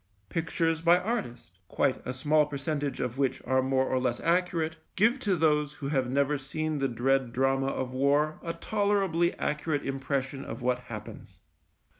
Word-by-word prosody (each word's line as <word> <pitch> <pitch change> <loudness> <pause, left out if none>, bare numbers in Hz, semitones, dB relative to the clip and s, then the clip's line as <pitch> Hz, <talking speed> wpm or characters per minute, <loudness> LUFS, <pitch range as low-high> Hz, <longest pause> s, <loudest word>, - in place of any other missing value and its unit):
Pictures 165 0 0
by 170 +1 +6
artists, 125 - -4
quite 130 - 0
a - - -1
small 150 +3 +2
percentage 145 0 -3
of 125 +2 -3
which 135 -2 +1
are 130 0 +2
more 130 0 +1
or 130 - +1
less 125 -2 -1
accurate, 170 -2 +1 0.2
give 230 +7 +3
to 205 -7 +1
those 150 -2 +2
who 140 -1 -5
have 130 -4 0
never 140 +2 +1
seen 155 +2 -3
the 135 - +1
dread 130 +1 +1
drama 135 +2 +1
of 130 -2 -2
war 145 +4 +2
a 165 - -3
tolerably 195 -2 +1
accurate 150 -1 -1
impression 135 0 -2
of 125 - -7
what 125 0 +1
happens. 110 -4 -9
140 Hz, 165 wpm, -29 LUFS, 130-165 Hz, 0.2 s, by